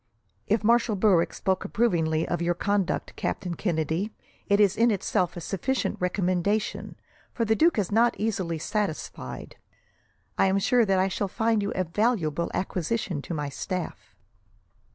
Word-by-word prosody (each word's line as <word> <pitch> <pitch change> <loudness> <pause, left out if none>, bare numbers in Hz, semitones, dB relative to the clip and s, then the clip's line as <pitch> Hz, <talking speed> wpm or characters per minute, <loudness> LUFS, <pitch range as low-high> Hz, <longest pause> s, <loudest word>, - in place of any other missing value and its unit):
"If 215 +1 +1
Marshal 230 0 +3
Berwick 185 -4 +3
spoke 190 -2 -1
approvingly 165 -8 +1
of 175 - -2
your 175 0 +1
conduct, 200 0 -1
Captain 180 -3 -3
Kennedy, 170 +3 -1 0.4
it 200 0 +3
is 205 -2 +4
in 235 +2 +4
itself 185 -4 0
a - - -5
sufficient 225 +10 -1
recommendation, 185 +3 -1 0.4
for 230 - 0
the 220 0 +2
duke 330 +4 +3
is 200 -3 0
not 235 +3 +3
easily 195 -7 -1
satisfied. 155 - -4 0.8
I - - +5
am 190 +1 +2
sure 235 +4 +3
that 195 -2 +2
I 185 +1 +3
shall 195 +1 -2
find 225 +2 +1
you 200 - -2
a 185 - +1
valuable 170 -4 0
acquisition 185 -3 -2
to 170 - -5
my 145 -1 -3
staff." 180 +5 -5
195 Hz, 155 wpm, -26 LUFS, 170-215 Hz, 0.8 s, I